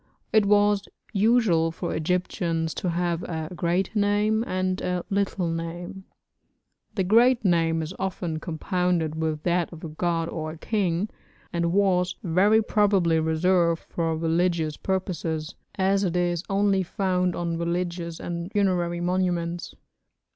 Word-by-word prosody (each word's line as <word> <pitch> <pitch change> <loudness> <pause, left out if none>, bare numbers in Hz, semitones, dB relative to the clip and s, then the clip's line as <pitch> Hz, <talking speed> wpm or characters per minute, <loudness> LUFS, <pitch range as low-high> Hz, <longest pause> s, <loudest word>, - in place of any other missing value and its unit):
It 215 -2 +5
was 205 0 +3 0.3
usual 200 -6 +3
for 170 +1 -4
Egyptians 165 -1 -1
to 180 - -2
have 170 0 -1
a 160 -1 -4
'great 175 +5 0
name' 210 +2 +2
and 185 0 -1
a 180 -1 -2
'little 195 -2 0
name'; 170 +3 -5 0.9
the 195 - +1
great 235 +4 +4
name 165 -2 +2
is 160 +4 -6
often 175 -4 -3
compounded 170 0 -1
with 155 -1 -2
that 175 -1 +1
of 165 -2 -11
a 165 - -5
god 165 +1 -1
or 155 -2 -4
a - - -11
king, 190 0 0 0.5
and 170 -1 0
was 185 -2 +2
very 200 +5 +4
probably 195 -7 +3
reserved 170 +1 +2
for 165 -2 -2
religious 165 -1 +1
purposes, 170 -4 -2 0.2
as 195 +1 +2
it 180 -3 -1
is 175 -1 0
only 195 -1 +2
found 180 -1 0
on 170 -1 -2
religious 170 -1 -2
and 170 +2 -5
funerary 180 -4 +1
monuments. 175 -1 -1
175 Hz, 135 wpm, -25 LUFS, 165-190 Hz, 0.9 s, It